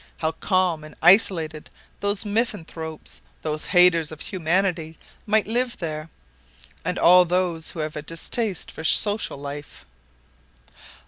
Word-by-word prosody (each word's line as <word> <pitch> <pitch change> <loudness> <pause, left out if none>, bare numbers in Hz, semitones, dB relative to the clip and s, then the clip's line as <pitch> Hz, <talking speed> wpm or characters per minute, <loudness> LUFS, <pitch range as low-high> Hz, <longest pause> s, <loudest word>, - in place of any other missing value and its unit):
How 160 0 -1
calm 180 -4 0
and 155 - -12
isolated 170 -4 +3 0.3
those 200 +1 -1
misanthropes, 170 -8 -4 0.2
those 155 -1 -2
haters 175 -4 +5
of 155 - -10
humanity 175 -2 -1 0.3
might 215 0 +2
live 240 +3 -1
there, 155 -1 -5 0.7
and 180 +1 -2
all 180 +1 +6
who 175 -1 -1
have 155 0 -4
a 150 - -4
distaste 175 +6 -2
for 160 - -9
social 205 +2 +2
life!" 145 - -9
170 Hz, 120 wpm, -23 LUFS, 155-195 Hz, 0.7 s, all